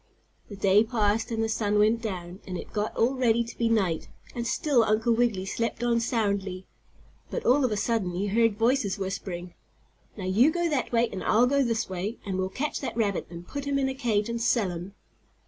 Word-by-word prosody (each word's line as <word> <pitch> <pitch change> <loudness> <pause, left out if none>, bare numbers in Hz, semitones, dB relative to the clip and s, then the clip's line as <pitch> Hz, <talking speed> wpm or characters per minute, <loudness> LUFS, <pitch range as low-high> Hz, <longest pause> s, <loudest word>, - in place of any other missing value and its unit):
The 205 - -7
day 195 +2 +4
passed, 220 -1 0
and 225 -1 -1
the - - +1
sun 210 -1 0
went 220 +2 +3
down, 185 -4 -5
and 180 -1 -4
it - - -9
got 210 0 -2
all 240 +4 +3
ready 235 -3 +2
to 230 0 -10
be 230 -1 +2
night, 190 -8 +1 0.3
and 235 -1 -3
still 260 -1 +2
Uncle 220 +2 +2
Wiggily 225 -5 +1
slept 230 +3 -2
on 235 -1 +2
soundly. 200 -5 -1 0.6
But - - -4
all 270 +3 +4
of 250 - +1
a 210 - 0
sudden 200 -5 0
he 190 +3 -1
heard 220 +1 +2
voices 230 -3 +1
whispering: 185 -2 -5 0.6
"Now 190 - -5
you 215 +10 +4
go 345 +1 0
that 285 -7 -1
way 235 0 +3
and 190 -2 -5
I'll 230 +3 +4
go 280 +2 +2
this 230 -4 0
way, 190 +5 -4
and 190 -2 -2
we'll 185 0 -1
catch 285 +10 -3
that 270 - -4
rabbit 205 -4 0
and 170 0 -10
put 285 0 -5
him 280 0 0
in 270 -1 +1
a - - -2
cage 230 -6 0
and 235 0 -3
sell 225 -5 +2
him!" 175 +3 -7
225 Hz, 215 wpm, -27 LUFS, 195-240 Hz, 0.6 s, day